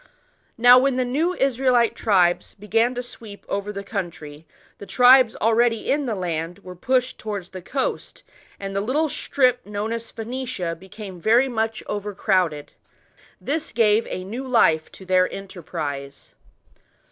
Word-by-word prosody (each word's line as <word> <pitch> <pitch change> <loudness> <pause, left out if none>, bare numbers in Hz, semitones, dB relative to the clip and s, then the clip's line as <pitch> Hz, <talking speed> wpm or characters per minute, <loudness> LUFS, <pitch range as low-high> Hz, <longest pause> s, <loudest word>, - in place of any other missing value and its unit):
Now, 245 +2 +8
when 270 0 +1
the 255 0 0
new 315 +9 0
Israelite 255 -4 +2
tribes 180 -5 +1
began 225 +4 0
to 245 - -3
sweep 220 -4 -12
over 200 +1 -3
the 200 -1 -6
country, 165 -7 -6 0.3
the 200 - -10
tribes 250 +3 +6
already 230 0 +1
in 285 -1 0
the 225 - -1
land 170 -2 -3
were 180 0 -9
pushed 255 +6 0
towards 200 -4 -5
the 185 - -8
coast, 265 +9 -4 0.4
and 195 -1 -6
the 195 - +1
little 290 +9 0
strip 255 -3 +1
known 210 +2 -4
as 230 0 -6
Phoenicia 230 -7 -4
became 190 +1 -10
very 235 +7 +4
much 225 -3 -2
overcrowded. 190 -7 -1 0.7
This 305 +2 -3
gave 220 -1 +3
a 185 - -5
new 240 +8 -6
life 160 -11 +3
to 190 - -12
their 185 0 +2
enterprise. 155 -7 -7
215 Hz, 145 wpm, -23 LUFS, 185-250 Hz, 0.7 s, Now